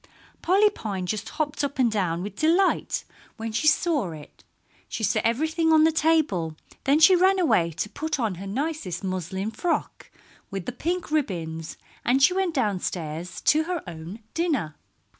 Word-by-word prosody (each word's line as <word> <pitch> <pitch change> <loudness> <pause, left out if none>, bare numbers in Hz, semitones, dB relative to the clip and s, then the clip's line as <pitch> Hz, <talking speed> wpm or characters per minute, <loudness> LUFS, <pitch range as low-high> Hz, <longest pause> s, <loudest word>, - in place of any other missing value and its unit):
Polly 405 +4 +4
Pine 200 - -4
just 215 +3 -3
hopped 300 -1 -2
up 280 -1 -2
and 245 -3 +3
down 180 -5 -1
with 200 0 -6
delight 340 - +2 0.3
when 225 0 -4
she 230 +8 0
saw 305 - +2
it. 150 -2 -13 0.5
She 220 - -4
set - - +1
everything 315 +7 +1
on 315 -1 +6
the 320 - +5
table; 300 - +1 0.3
then 280 +3 +4
she 345 +4 +8
ran 380 +2 +4
away 240 - +3
to 165 - -2
put 315 +6 -3
on 225 -5 0
her 195 - -6
nicest 225 - -3
muslin 190 +2 -3
frock 330 +10 -2 0.4
with 195 -3 -5
the - - -3
pink 340 +7 -3
ribbons, 165 - -2 0.3
and 265 +3 +3
she 360 - +6
went 375 -3 0
downstairs 180 - -2
to 310 +1 +3
her 350 -2 -3
own 175 +5 -8
dinner. 290 - -1
245 Hz, 165 wpm, -25 LUFS, -, 0.5 s, she